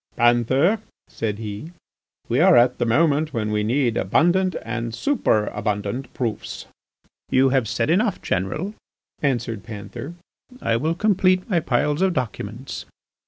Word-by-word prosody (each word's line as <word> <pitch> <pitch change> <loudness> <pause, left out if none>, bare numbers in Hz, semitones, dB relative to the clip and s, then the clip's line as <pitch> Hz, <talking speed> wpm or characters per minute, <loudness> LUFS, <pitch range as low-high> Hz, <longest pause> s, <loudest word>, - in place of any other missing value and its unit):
"Panther," 125 - +3 0.3
said 105 -2 -3
he, 110 +9 -7 0.5
"we - - +1
are - - +6
at 120 +1 +4
the 120 - +1
moment 150 +4 +2
when 105 -2 -1
we 105 0 +1
need 120 +1 +1
abundant 185 +2 +2
and 115 0 -4
superabundant 105 - -1
proofs." 115 -4 -4 0.6
"You 130 +1 +4
have 130 -4 +1
said 120 +5 0
enough, 205 +5 +2
General," 150 - -2 0.5
answered 120 -6 -1
Panther, 110 - -8 0.4
"I 115 - 0
will 155 +8 0
complete 185 -1 +2
my 180 -5 +2
piles 145 +2 0
of 190 -1 +3
documents." 120 -1 -4
125 Hz, 130 wpm, -23 LUFS, 115-165 Hz, 0.6 s, are